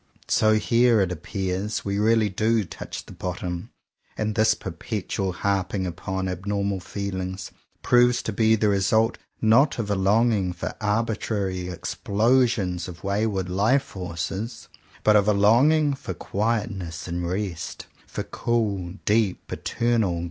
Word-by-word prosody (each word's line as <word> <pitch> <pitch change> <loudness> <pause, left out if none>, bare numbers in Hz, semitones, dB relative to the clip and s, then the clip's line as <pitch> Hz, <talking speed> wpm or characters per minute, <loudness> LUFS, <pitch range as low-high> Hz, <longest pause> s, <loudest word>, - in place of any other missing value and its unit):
So 110 0 +4
here, 115 +1 +4
it 95 -2 0
appears, 95 +4 -3
we 100 0 -1
really 110 0 +3
do 110 +3 +1
touch 85 - -8
the - - -13
bottom; 90 -1 -4 0.5
and 110 0 -1
this 110 0 +3
perpetual 95 -1 -3
harping 95 0 -1
upon 95 +2 -3
abnormal 100 +1 -2
feelings, 95 0 -5 0.3
proves 125 -1 +4
to - - -3
be 110 0 +4
the 110 -1 +1
result 110 +4 +2 0.2
not 125 +7 +5
of 105 -3 -2
a - - +2
longing 100 -1 +2
for 90 - -5
arbitrary 105 -4 -1
explosions 105 0 +1
of 85 -2 -10
wayward 100 -1 0
life 105 +9 +2
forces, 95 - -5 0.3
but 105 - +5
of 105 -1 +4
a 105 - +5
longing 140 +9 +4
for 95 -9 -6
quietness 100 -6 -2
and 85 0 -2
rest, 95 -3 -4
— - - -29
for - - -4
cool, 100 -6 -1
deep, 105 -3 +1
eternal. 115 -7 0
100 Hz, 135 wpm, -25 LUFS, 95-110 Hz, 0.5 s, not